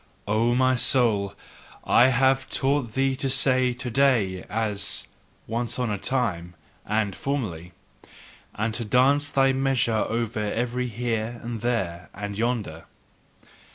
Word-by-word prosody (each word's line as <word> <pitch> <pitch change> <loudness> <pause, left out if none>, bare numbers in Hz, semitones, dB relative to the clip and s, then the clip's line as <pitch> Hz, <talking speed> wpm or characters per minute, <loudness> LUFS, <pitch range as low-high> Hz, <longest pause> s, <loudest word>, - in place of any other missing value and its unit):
O 115 +3 +2
my 130 0 +3
soul, 110 -6 +2 0.5
I 125 - +5
have 130 +1 +2
taught 135 -4 0
thee 135 0 +1
to 135 -1 -2
say 130 -1 +3
"to 125 0 -5
day" 115 -8 +2
as 105 -2 -1 0.4
"once 115 +1 -2
on 125 -3 -1
a 100 - -2
time" 90 -9 -2 0.3
and 105 -2 0
"formerly," 100 - -4 0.8
and 110 +1 -1
to 120 - -1
dance 135 +6 +3
thy 135 -1 +3
measure 130 -4 +1
over 115 -1 -2
every 120 +4 -2
Here 115 0 -3
and 120 -1 -5
There 95 -8 -2
and 100 0 -5
Yonder. 110 -8 -2
120 Hz, 130 wpm, -25 LUFS, 105-130 Hz, 0.8 s, I